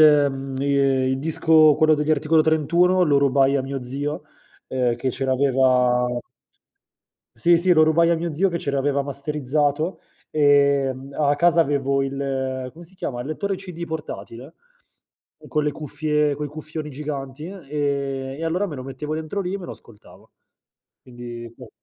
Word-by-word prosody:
ehm, 140 -3 +4
il 135 -1 +1
disco, 155 0 +4
quello 155 0 +4
degli 150 +1 +1
Articolo 155 +1 +3
31, 170 +4 +3
lo 145 -4 +4
rubai 140 0 +3
a 130 - 0
mio 135 -1 -5
zio, 145 +5 -4 0.5
ehm, 125 -2 0
che 130 +1 -2
ce 135 +2 -4
l'aveva 130 -2 +3 1.3
Sì, 170 +9 +4
sì 180 +2 +3
lo 155 -1 +6
rubai 165 +2 +3
a 170 - +3
mio 170 0 -3
zio 190 +6 +2
che 170 -1 -2
ce 140 - -3
l'aveva 140 0 +1
masterizzato. 145 +3 -1 0.3
Ehm, 140 -2 +2
a 145 -1 +3
casa 170 +1 +4
avevo 140 -2 +1
il 135 -1 -3
come 170 +2 -13
si 185 - -13
chiama? 120 -8 -4
Il 125 - -6
lettore 195 +5 -2
CD 180 -3 -7
portatile? 150 -4 -7 0.9
Con 150 -1 0
le 150 - +1
cuffie 150 0 -1
coi 150 0 -4
cuffioni 155 0 -7
giganti, 140 +1 -6
ehm, 190 -1 -9 0.8
e - - -3
allora 180 +5 0
me 155 - -7
lo 130 - -6
mettevo 135 +4 -5
dentro 160 +5 -4
lì 185 +1 -3
e - - -3
me 175 - -8
lo - - -7
ascoltavo. 105 -2 -15 0.7
Quindi 120 -2 -9
cos 125 -3 -12
145 Hz, 160 wpm, -22 LUFS, 135-160 Hz, 1.3 s, lo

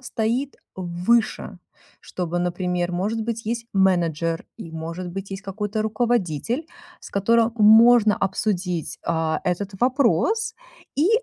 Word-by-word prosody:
стоит 245 +2 -2 0.2
выше. 185 +3 0 0.4
Чтобы, 175 -1 -4
например, 180 0 -1
может 210 +6 -1
быть, 230 0 -4
есть 235 +1 -2
менеджер. 170 -4 +1
И, 165 - -8
может 165 +3 -5
быть, 195 +2 -6
есть 195 0 -6
какой-то 210 +2 -3
руководитель, 230 - -1 0.3
с - - -11
которым 230 +3 +2
можно 220 0 +7
обсудить, 185 -4 -2
а, 160 -1 0
этот 180 +3 -1
вопрос 265 - +2 0.4
и 305 +6 +2
200 Hz, 120 wpm, -23 LUFS, 175-230 Hz, 0.4 s, можно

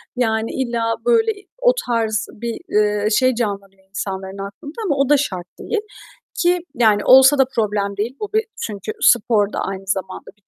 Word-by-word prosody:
Yani, 220 -2 0
illa, 235 -3 -1
böyle, 455 -2 +3 0.3
o - - +5 0.2
tarz 225 -2 0
bir, 235 +1 -5 0.2
eee, 210 0 +1
şey 255 +3 +3
canlanıyor 200 -4 -4
insanların 195 -1 -5
aklında 290 +9 -11
ama 305 -7 +1
o 275 0 +1
da 295 - +6
şart 185 -11 -3
değil 440 -2 -2 0.6
ki, 355 0 +3 0.2
yani, 215 -3 +3
olsa 265 +2 +7
da 270 - +5
problem 205 -2 -1
değil. 230 +6 -2
Bu 420 - -3
bir 440 +1 +2 0.2
çünkü 210 -1 -6
spor 210 -3 +3
da - - -2
aynı 195 0 -5
zamanda 190 -2 -3
bir 205 - -37
225 Hz, 170 wpm, -20 LUFS, 200-265 Hz, 0.6 s, olsa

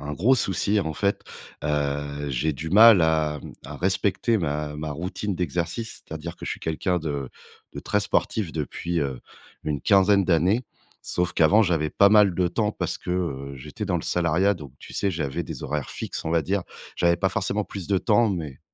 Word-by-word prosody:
un 75 - -5
gros 110 - +3
souci 100 -2 +1
en 80 -4 -3
fait. 100 +6 0 0.4
Heu, 75 -1 -2
j'ai 70 +5 0
du 80 +3 -6
mal 110 0 +8
à 80 -2 +1
mmh, - - -9
à - - -7
respecter 100 +4 +1
ma 75 -3 -2
ma 75 0 -4
routine 90 +6 -3
d'exercice 90 +6 -3
c'est-à-dire 80 +1 -7
que - - -9
je - - -3
suis - - -5
quelqu'un 90 +3 -1
de 70 -5 -4 0.4
de - - -6
très - - 0
sportif 100 -8 0
depuis, 85 +2 -3
heu, 70 -3 -3 0.4
une 75 -2 -2
quinzaine 100 +4 +4
d'années. 90 +8 +2 0.4
Sauf 90 +1 +1
qu'avant 95 +8 +5
j'avais 80 -6 0
pas 100 - +5
mal 105 -3 +5
de 90 0 +1
temps 105 +4 -1
parce - - -3
que, - - -6
heu, 70 -7 -3
j'étais 75 +10 -7
dans 95 -3 0
le 80 - -4
salariat 90 +4 +2
donc 75 -7 -10
tu - - -12
sais, 100 - 0
j'avais 80 -2 -3
des 75 - -7
horaires 75 -3 -3
fixes - - -4
on 80 - -2
va 85 -1 +2
dire 95 +4 -1 0.3
j'avais 85 0 +3
pas 95 +2 +1
forcément 100 +1 -1
plus 95 -4 -7
de 100 -1 +2
temps 110 +2 +3
mais 80 -8 -5
85 Hz, 200 wpm, -25 LUFS, 75-100 Hz, 0.4 s, mal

